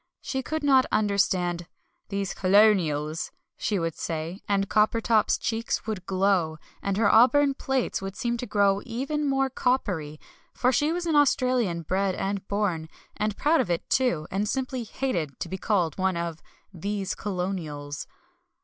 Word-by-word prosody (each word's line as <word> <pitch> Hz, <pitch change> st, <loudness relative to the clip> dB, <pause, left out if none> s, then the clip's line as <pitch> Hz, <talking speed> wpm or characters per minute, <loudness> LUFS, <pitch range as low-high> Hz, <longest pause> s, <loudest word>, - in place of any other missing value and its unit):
She 265 Hz, -, -2 dB
could 315 Hz, +4 st, -3 dB
not 265 Hz, -2 st, +5 dB
understand 185 Hz, -4 st, +1 dB, 0.4 s
"these 200 Hz, -2 st, -2 dB
colonials," 180 Hz, -6 st, +3 dB, 0.2 s
she 210 Hz, -, -1 dB
would 165 Hz, -2 st, -1 dB
say, 165 Hz, +4 st, -4 dB
and 200 Hz, -1 st, +2 dB
Coppertop's 215 Hz, +1 st, +3 dB
cheeks 225 Hz, 0 st, -2 dB
would 210 Hz, -5 st, -4 dB
glow 185 Hz, -4 st, +1 dB, 0.2 s
and 200 Hz, -1 st, -1 dB
her 215 Hz, -2 st, +3 dB
auburn 275 Hz, +4 st, +5 dB
plaits 265 Hz, -5 st, -1 dB
would 195 Hz, 0 st, -5 dB
seem 240 Hz, +2 st, -1 dB
to 245 Hz, -, -5 dB
grow 200 Hz, -1 st, +2 dB
even 275 Hz, +5 st, -2 dB
more 270 Hz, 0 st, +2 dB
coppery, 195 Hz, -, -1 dB, 0.4 s
for 250 Hz, -, +2 dB
she 295 Hz, +4 st, +2 dB
was 345 Hz, +1 st, -2 dB
an 325 Hz, -2 st, +1 dB
Australian 250 Hz, -, +2 dB
bred 190 Hz, +3 st, 0 dB
and 195 Hz, 0 st, -3 dB
born, 185 Hz, -6 st, -1 dB, 0.3 s
and 210 Hz, 0 st, -2 dB
proud 310 Hz, +3 st, +3 dB
of -, -, -3 dB
it, 170 Hz, -1 st, -1 dB
too, 245 Hz, -13 st, +2 dB
and 200 Hz, +2 st, -1 dB
simply 255 Hz, -1 st, -2 dB
hated 175 Hz, -, -3 dB
to -, -, -3 dB
be 190 Hz, -, -5 dB
called 180 Hz, -6 st, 0 dB
one 190 Hz, -1 st, +1 dB
of 170 Hz, -2 st, -4 dB, 0.3 s
"these 200 Hz, +2 st, -3 dB
colonials." 175 Hz, -7 st, -4 dB
200 Hz, 155 wpm, -26 LUFS, 175-250 Hz, 0.4 s, not